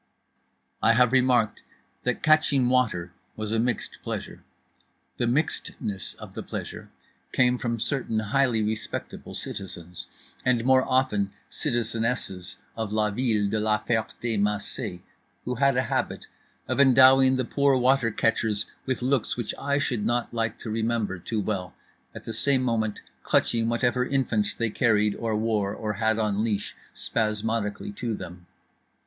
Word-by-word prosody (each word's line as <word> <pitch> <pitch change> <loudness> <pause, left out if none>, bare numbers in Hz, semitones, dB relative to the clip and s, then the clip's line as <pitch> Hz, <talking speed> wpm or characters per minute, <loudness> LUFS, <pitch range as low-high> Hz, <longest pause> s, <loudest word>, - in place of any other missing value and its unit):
I 115 - +5
have 125 +1 +4
remarked 125 -4 +3 0.4
that 125 +2 -1
catching 150 -4 +4
water 110 -9 +1 0.2
was 110 -1 -4
a 115 - +1
mixed 120 -1 -2
pleasure. - - -6 0.7
The 120 - 0
mixedness 120 -7 -2
of - - -11
the - - -5
pleasure - - -7 0.4
came 125 0 +3
from 120 -1 -2
certain 125 -3 -1
highly 115 +1 +1
respectable 110 +1 -4
citizens, 90 -2 -6 0.4
and 120 -2 +1
more 130 0 +5
often 105 -7 +1 0.2
citizenesses, 115 - -2 0.2
of 110 -2 -3
la 105 0 +1
ville 110 -2 +1
de 105 +2 0
La 105 0 +2
Ferté 110 0 -1
Macé; 105 -1 -2 0.4
who 125 - -1
had 135 +1 +2
a 130 - +3
habit - - -2 0.4
of - - -1
endowing 130 0 +7
the 130 -1 0
poor 140 +1 +2
water 130 -1 +3
catchers 110 -1 +2 0.2
with 130 -1 -1
looks 130 -2 +1
which 120 -3 -2
I 140 0 0
should 125 -7 -1
not 120 +2 0
like 115 -2 -1
to 110 - -5
remember 110 -4 -1
too 110 +4 -2
well, 95 -3 -3 0.4
at - - -8
the 115 - -5
same 130 +4 +4
moment 110 -4 -1 0.2
clutching 115 -1 +2
whatever 120 +1 +1
infants 115 -6 0
they 115 -2 -1
carried 105 -3 +2
or 115 0 -2
wore 105 -2 0
or 105 -1 -3
had 110 +1 +1
on 105 -1 0
leash 105 -3 -2 0.2
spasmodically 110 -1 -1
to 115 -3 -2
them. 90 -2 -9
115 Hz, 145 wpm, -26 LUFS, 105-125 Hz, 0.7 s, endowing